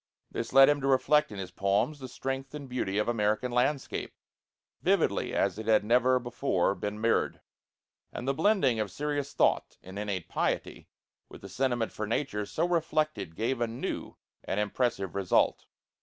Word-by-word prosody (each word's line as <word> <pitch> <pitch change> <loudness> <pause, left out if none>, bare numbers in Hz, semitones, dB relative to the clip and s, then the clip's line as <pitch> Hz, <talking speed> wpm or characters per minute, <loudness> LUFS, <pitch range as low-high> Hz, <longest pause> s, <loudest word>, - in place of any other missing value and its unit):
This - - -4
led 135 +1 +8
him 145 -1 +2
to 135 - -1
reflect 145 +2 +3
in 105 - -7
his 95 -1 -6
poems 100 +10 0
the 130 - -7
strength 135 +2 -5
and 145 -2 -7
beauty 120 -6 -2
of 105 - +1
American 110 +1 0
landscape, 130 +3 -1 0.7
vividly - - +1
as - - 0
it 110 - -6
had 110 -2 +4
never 125 +3 +4
before 120 -6 0
been 105 +1 -4
mirrored; 115 +1 +1 0.7
and 125 - -6
the 135 - +2
blending 155 - +2
of 105 -2 -1
serious 145 +5 -3
thought - - +1
and 95 +2 -8
innate 100 -4 -3
piety - - -2 0.4
with - - -12
the - - -9
sentiment 120 -3 0
for 110 - -4
nature 105 -3 -2
so 165 +2 0
reflected 155 - -1
gave 120 +4 -1
a 120 - +2
new 115 +2 -5 0.3
and 95 - -2
impressive 105 -2 -1
result. 100 -2 +1
120 Hz, 170 wpm, -29 LUFS, 105-135 Hz, 0.7 s, led